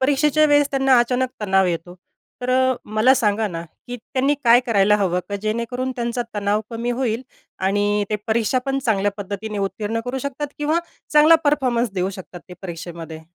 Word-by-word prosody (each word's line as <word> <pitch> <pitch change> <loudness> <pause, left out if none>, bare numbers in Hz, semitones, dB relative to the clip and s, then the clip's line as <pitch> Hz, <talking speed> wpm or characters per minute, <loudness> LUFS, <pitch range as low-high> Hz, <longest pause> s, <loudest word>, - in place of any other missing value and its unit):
परीक्षेच्या 290 +3 +3
वेळेस 290 -1 +3
त्यांना 270 -2 +4
अचानक 250 +2 +1
तणाव 190 -2 +3
येतो. 175 0 -3 0.5
तर 250 - -1
अ, 260 0 +3
मला 215 +5 +3
सांगा 220 -3 +1
ना, 165 -2 -5 0.2
की 245 - -5
त्यांनी 265 +4 0
काय 235 +1 +7
करायला 210 -2 +4
हवं? 180 -3 0
का, 200 - -2
जेणेकरून 235 +4 -2
त्यांचा 240 0 -2
तणाव 205 0 0
कमी 235 +1 -3
होईल 240 -1 -1 0.4
आणि 205 +1 +1
ते 210 - +1
परीक्षा 225 +2 +1
पण 270 0 0
चांगल्या 205 -6 +1
पद्धतीने 205 +1 -5
उत्तीर्ण 210 +3 -2
करू 250 +2 -3
शकतात 280 +2 -4
किंवा 300 +3 +1 0.3
चांगला 300 +2 +7
परफॉर्मन्स 250 -5 +1
देऊ 185 0 -1
शकतात 185 -2 -10
ते 180 - -9
परीक्षेमध्ये? 165 -2 -7
230 Hz, 170 wpm, -21 LUFS, 200-260 Hz, 0.5 s, काय